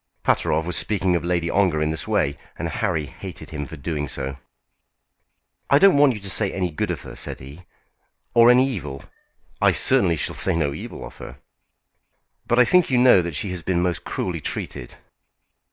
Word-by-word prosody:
Pateroff 80 - +1
was 90 -1 -2
speaking 95 -4 +1
of 85 - -1
Lady 85 -1 -1
Ongar 90 -3 +1
in 75 0 0
this 80 -1 -5
way, 70 +1 +1 0.2
and 85 - -3
Harry 80 -1 -1
hated 70 - -10
him 75 -2 -5
for 80 - -9
doing 75 0 -3
so. 65 +1 -4 1.3
"I 140 - +6
don't 195 +3 +6
want 140 -3 +4
you - - -7
to 100 - -4
say 100 +1 +2
any 90 -3 -2
good 75 - -3
of - - -3
her," - - -10
said - - -5
he, 70 +7 -12 0.7
"or 115 0 +6
any 125 +2 +5
evil." 75 - -6 0.6
"I - - +4
certainly 85 -4 +3
shall - - -3
say - - +1
no 75 -4 0
evil - - -8
of - - -12
her." - - -10 1.1
"But 120 - +1
I 125 - +6
think 180 +6 +3
you 130 - +2
know 125 -6 +6
that 85 -3 -5
she 95 +6 -3
has 90 -1 -5
been 90 0 0
most 90 -2 -1
cruelly - - -4
treated." - - -5
85 Hz, 195 wpm, -22 LUFS, 75-105 Hz, 1.3 s, I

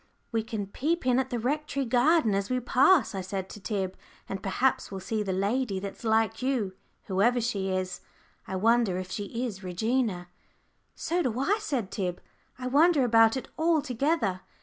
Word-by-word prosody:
"We 225 -1 +1
can 220 -2 -4
peep 305 - -2
in 255 0 +3
at 265 - -1
the 245 - -2
Rectory 280 +3 -1
garden 250 0 +3
as 195 0 -1
we 255 0 +1
pass," 265 +6 +4
I 195 - -3
said 190 0 -4
to - - -9
Tib, 195 -3 -3 0.3
"and 195 -1 -5
perhaps 245 +8 0
we'll 195 - -5
see 215 +3 -2
the 195 -2 -2
lady 200 +3 0
that's 200 +4 -7
like 225 0 +1
you, 250 -7 0 0.3
whoever 215 +6 +2
she 205 -5 -1
is. 185 0 -2 0.5
I 190 - -4
wonder 225 -1 +3
if 185 0 -5
she 205 - -3 0.2
is 200 -5 -6
Regina?" 190 0 -1 0.7
"So 350 +2 -1
do 250 -6 -1
I," 390 +11 +2
said 240 - -2
Tib; 180 -4 -2 0.4
"I 255 - -7
wonder 290 +3 +4
about 225 0 +5
it 260 - -6
altogether." 290 - +1
225 Hz, 175 wpm, -28 LUFS, 195-260 Hz, 0.7 s, about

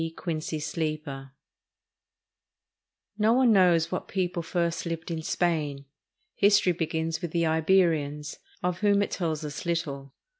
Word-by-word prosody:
QUINCY 160 -2 -3
SLEEPER 150 -4 -4 1.9
No 215 +2 +4
one 250 -1 +4
knows 180 -5 +4
what 185 - -3
people 180 -2 -1
first 170 0 -1
lived 165 0 -4
in 160 -1 -3
Spain. 155 -5 -1 0.5
History 200 -2 +4
begins 165 -1 -2
with 175 - -3
the 170 +1 0
Iberians, 160 -3 +1 0.2
of 180 0 -1
whom 205 -1 +3
it - - -4
tells 160 -4 -2
us 145 -1 -5
Httle. 145 -5 -3
165 Hz, 125 wpm, -27 LUFS, 155-180 Hz, 1.9 s, No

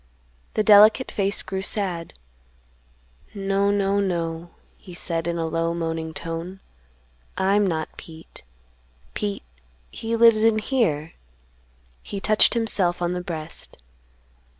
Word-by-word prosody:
The 215 - +2
delicate 215 +4 +6
face 200 0 0
grew 190 0 -4
sad: 190 -4 -2 1.2
"No, 195 0 +1
no, 200 0 +1
no," 170 -3 -2 0.3
he 180 - -13
said 165 -1 -3
in 170 0 -1
a 165 - -1
low 165 +1 -1
moaning 165 -1 -3
tone; 165 +4 -6 0.8
"I'm 200 +1 +2
not 160 -3 -3
Pete; 160 -1 -10 0.7
Pete, 205 -1 -3 0.5
he 225 +1 -3
lives 230 -1 +6
in 225 -1 +4
here;" 210 - 0 0.9
he 200 - -6
touched 215 +4 +3
himself 200 -6 +1
on 175 0 -1
the 180 - -3
breast. 165 -3 -6
190 Hz, 120 wpm, -23 LUFS, 165-205 Hz, 1.2 s, delicate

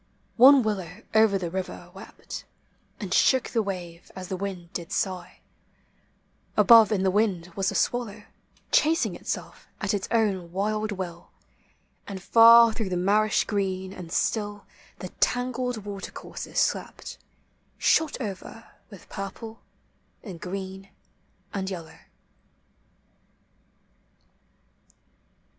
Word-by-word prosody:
One 265 +2 +8
willow 205 -5 -4
over 220 -2 +5
the 175 -3 -4
river 185 0 -5
wept, - - -9 0.6
And - - -4
shook 260 -2 +3
the 230 - +2
wave 180 -4 -6
as 185 -1 -7
the 190 - -2
wind 185 -2 -6
did 170 -2 -6
sigh; 185 -2 -3 1.2
Above 225 -3 +7
in 195 -3 +1
the 190 - +3
wind 185 -4 0
was 195 0 0
the 200 - -5
swallow, 225 -3 -1 0.5
Chasing 320 +2 +3
itself - - -6
at 195 0 -1
its 200 -2 -2
own 195 -7 0
wild 215 +3 -1
will, 175 -3 -6 0.8
And 195 -2 -6
far 230 +3 +7
thro' 215 -4 -3
the 180 - -1
niarisli 205 +4 +2
green 190 -2 -2
and 180 -4 -9
Btill 205 +3 -1 0.3
The - - -7
tangled 245 -3 -1
watercourses 200 -1 -7
slept, - - -1 0.6
Shot 315 -4 +2
over 225 0 -7 0.2
with 200 -5 -14
purple, 220 +3 -7 0.6
and 180 -6 -9
green, 190 +1 -6 0.6
and 195 -1 -2
yellow 170 -4 -6
in. - - -20
200 Hz, 115 wpm, -26 LUFS, 185-220 Hz, 1.2 s, One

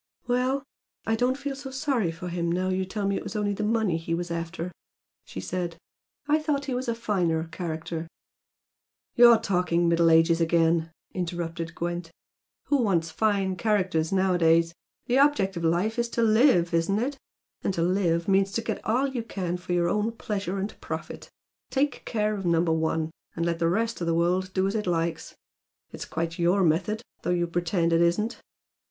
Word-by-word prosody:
"Well, 255 +3 +1 0.4
I 225 - +1
don't 250 +3 +1
feel 280 -1 -4
so 270 0 -7
sorry 265 - 0
for 165 +2 -7
him 170 -1 -1
now 185 +2 0
you 185 0 0
tell 200 +2 -3
me 200 - +1
it - - -5
was - - -7
only 205 -1 0
the 200 - -4
money 215 -5 +1
he 165 0 -2
was 175 0 -4
after" 170 +1 -4 0.5
she - - -7
said 175 - -3 0.5
"I 300 +1 +3
thought 300 -2 -1
he 270 - -2
was 250 +1 -2
a 235 - 0
finer 180 -8 0
character 165 -1 -4 0.6
" - - -62
"You're 240 -1 +8
talking 180 -4 +1
'Middle 170 0 +4
Ages' 165 +1 +4
again," 165 0 +2 0.2
interrupted 170 -2 -4
Gwent 175 0 -3 0.6
"Who 285 - +2
wants 170 -7 +1
fine 195 0 +1
characters 185 -7 +1
nowadays? 170 -3 +3 0.3
The 250 +2 +2
object 275 -10 +3
of 170 - -4
life 180 +8 +1
is 235 0 0
to 235 - +3
LIVE, 220 -6 +4
isn't 170 +4 +2
it? 270 +5 -1 0.5
And - - +1
to 165 - +1
'live' 170 -2 +1
means 195 0 +3
to 230 - -1
get 220 -2 -3
all 245 +5 +1
you 265 -3 -2
can 185 -6 -3
for 180 0 -4
your 175 -1 +2
own 210 +5 0
pleasure 200 -4 -3
and 195 +2 -5
profit, - - -6 0.4
take 285 +1 -1
care 215 -2 0
of 200 -2 -4
Number 170 -1 +2
One! 160 0 0 0.2
and 170 - -1
let 170 -1 -1
the 165 -1 +2
rest 225 +3 -1
of 170 - -1
the 165 - +2
world 180 +2 +1
do 190 0 +2
as 195 - 0
it 210 -3 -2
likes. 170 -1 -1 0.6
It's - - -7
quite 165 +2 -3
YOUR 180 +3 +3
method, 195 +7 +1 0.2
though - - -3
you 175 -1 +2
pretend 170 0 0
it 165 - +4
isn't!" 195 +7 +1
180 Hz, 190 wpm, -26 LUFS, 170-220 Hz, 0.6 s, You're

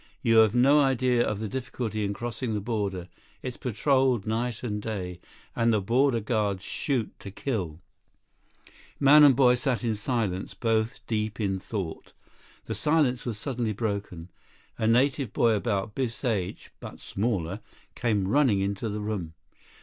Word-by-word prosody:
"You 115 -1 +4
have 110 0 +6
no 135 +4 +5
idea 130 -3 +3
of 105 - -1
the 110 +1 -4
difficulty 120 -3 -3
in 100 - -1
crossing 120 0 -3
the - - 0
border. 100 -5 -3 0.4
It's 125 -2 -4
patroled 130 -1 +1
night 115 +2 -2
and 105 -3 -3
day. 95 -5 -5 0.4
And 115 0 +2
the 110 - +3
border 120 +5 +2
guards 105 -4 -1
shoot 130 -7 -1
to 100 - -8
kill." 95 - -4 1.2
48 - - -29
Man 145 +2 +8
and 140 -3 +7
boy 125 -1 +5
sat 125 -3 -1
in 115 -2 +1
silence, 105 -4 -2
both 115 0 -1
deep 110 -1 -2
in 95 -3 0
thought. 95 -5 -6 0.5
The 110 - -3
silence 130 +2 +1
was 115 -3 -3
suddenly 120 -2 -2
broken. 100 -5 -4 0.4
A 110 - -1
native 130 +1 +2
boy 115 - +3
about 105 -1 -1
Biff's 125 +1 -3
age, 100 -7 -2
but - - -9
smaller, 100 -3 -2 0.3
came 105 -6 0
running 130 -4 +3
into 100 +3 -2
the 105 0 -4
room. 100 -7 -4
110 Hz, 155 wpm, -27 LUFS, 100-125 Hz, 1.2 s, Man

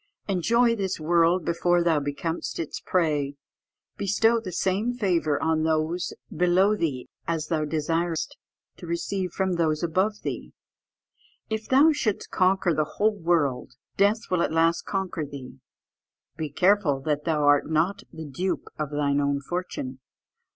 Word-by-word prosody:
"Enjoy 230 +5 +3
this 190 -5 -2
world 170 +2 +3
before 175 +1 +2
thou 165 -3 +3
becomest 145 +4 -3
its 165 - -4
prey. 150 -6 0 0.6
"Bestow 225 +4 +2
the 200 -5 -7
same 195 +7 0
favour 170 - +1
on 160 -1 +2
those 160 +2 0 0.2
below 185 +4 +3
thee 145 -10 -2 0.2
as 160 -2 -2
thou 155 -3 0
desirest 165 +2 -1 0.4
to 175 - -10
receive 180 +2 -2
from 190 0 0
those 155 -1 +1
above 190 +6 0
thee. - - -5 1.0
"If 220 0 -3
thou 280 +5 +6
shouldst 220 -9 -2
conquer 185 -1 +2
the 155 -1 -1
whole 215 +1 +3
world, 160 -8 0 0.2
death 205 +3 +2
will 180 -2 +2
at - - 0
last 165 +1 +2
conquer 190 -5 -2
thee. 135 -3 -9 0.8
"Be 155 -2 -4
careful 180 -2 +3
that 150 0 -1
thou 155 -3 +1
art 145 +1 +4
not 160 +5 +1
the 160 0 -8
dupe 175 +7 -3
of 150 -2 -2
thine 145 -1 +1
own 140 0 +1
fortune. 140 -4 -5
170 Hz, 145 wpm, -26 LUFS, 150-190 Hz, 1.0 s, thou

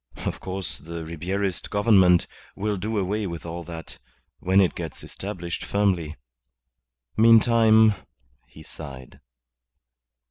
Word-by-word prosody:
Of - - -3
course 95 -1 -4
the 85 0 -7
Ribierist 90 +4 -3
Government 100 -4 +4 0.3
will 105 +1 -1
do 105 +3 -3
away 100 +2 -1
with 85 -2 -7
all 85 +1 -6
that 80 -1 -9 0.4
when 95 +2 +3
it 95 -3 +3
gets 80 -3 -7
established 90 -4 -6
firmly. 90 -7 0 1.0
Meantime 110 -1 +6 0.3
" - - -42 0.2
He 80 - -14
sighed. 70 -5 -11
95 Hz, 115 wpm, -24 LUFS, 85-105 Hz, 1.0 s, Meantime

